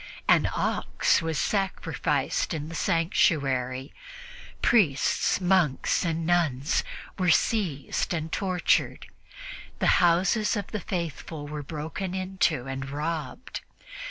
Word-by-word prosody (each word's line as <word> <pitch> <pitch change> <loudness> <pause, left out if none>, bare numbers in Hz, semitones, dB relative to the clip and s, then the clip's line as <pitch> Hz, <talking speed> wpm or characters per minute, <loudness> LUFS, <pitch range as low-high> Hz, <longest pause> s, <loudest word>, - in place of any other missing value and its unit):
An - - +4
ox - - +1
was 160 -1 -2
sacrificed 195 -3 -1
in 150 0 -5
the - - -8
sanctuary; 135 -6 +1 0.7
priests, 170 - +3
monks 180 -7 +2
and 165 -1 -1
nuns 160 -5 +1 0.4
were 180 -1 +2
seized 170 -5 +1
and 160 -2 -2
tortured; 185 -1 0 0.7
the - - +3
houses 185 +6 +3
of 205 -2 -2
the 215 - -2
faithful 165 -4 -5
were 150 0 -5
broken 160 +6 -5
into 185 -8 0
and 135 0 -5
robbed. 150 - -4
165 Hz, 105 wpm, -27 LUFS, 145-185 Hz, 0.7 s, An